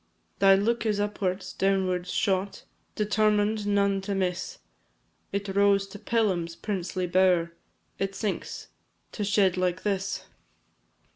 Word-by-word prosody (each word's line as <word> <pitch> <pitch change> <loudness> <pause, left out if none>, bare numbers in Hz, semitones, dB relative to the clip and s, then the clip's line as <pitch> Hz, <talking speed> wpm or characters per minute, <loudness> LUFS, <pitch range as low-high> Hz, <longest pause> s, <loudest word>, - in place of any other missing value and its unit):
Thy 195 -1 +7
look 230 +5 +1
is 210 -2 0
upwards, 200 -2 -2
downwards 185 -2 0
shot, 195 0 -1 0.3
Determined 210 0 +1
none 200 -1 +2
to 200 +1 -3
miss; 185 -1 -2 0.7
It 200 0 -3
rose 200 0 +3
to 205 - -10
Pelham's 185 -8 0
princely 185 -2 -3
bower, 180 -2 +3 0.5
It 195 0 -2
sinks 210 -2 -4 0.4
to 210 - -4
shed 195 -2 +2
like 180 0 0
this! 200 -1 -2
195 Hz, 120 wpm, -27 LUFS, 185-205 Hz, 0.7 s, Thy